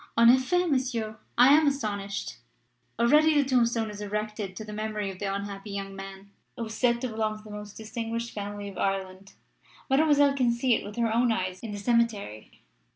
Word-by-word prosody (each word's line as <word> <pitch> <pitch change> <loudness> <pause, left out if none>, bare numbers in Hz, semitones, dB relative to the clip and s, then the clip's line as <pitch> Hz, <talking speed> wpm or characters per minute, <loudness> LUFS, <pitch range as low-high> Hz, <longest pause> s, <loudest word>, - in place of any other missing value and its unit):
"En 230 0 +8
effet, 350 +8 +2
Monsieur, 245 -6 -1 0.2
I 250 +4 +8
am 310 0 +5
astonished." 205 - -2 0.6
"Already 300 +7 +5
the 280 - +1
tombstone 235 -4 +2
is 210 0 -8
erected 210 -1 -4
to 220 - -7
the 210 - -8
memory 210 -2 -3
of 185 - -12
the 200 -1 -2
unhappy 200 +1 -5
young 195 -1 -5
man, 195 0 -10 0.3
who 235 - -3
is 220 - -7
said 235 +1 +2
to 255 - -1
belong 215 -2 -3
to 215 - -12
a - - -9
most 210 0 -8
distinguished 230 +1 -4
family 205 0 -5
of 195 -2 -8
Ireland. 195 0 -3 0.6
Mademoiselle 285 -1 +4
can 255 -3 +2
see 240 +1 +2
it - - 0
with 205 - -8
her 230 -2 0
own 240 +1 +3
eyes 185 -3 -2
in 225 - -7
the 205 - -5
cemetery." 210 - -1
220 Hz, 195 wpm, -27 LUFS, 200-240 Hz, 0.6 s, En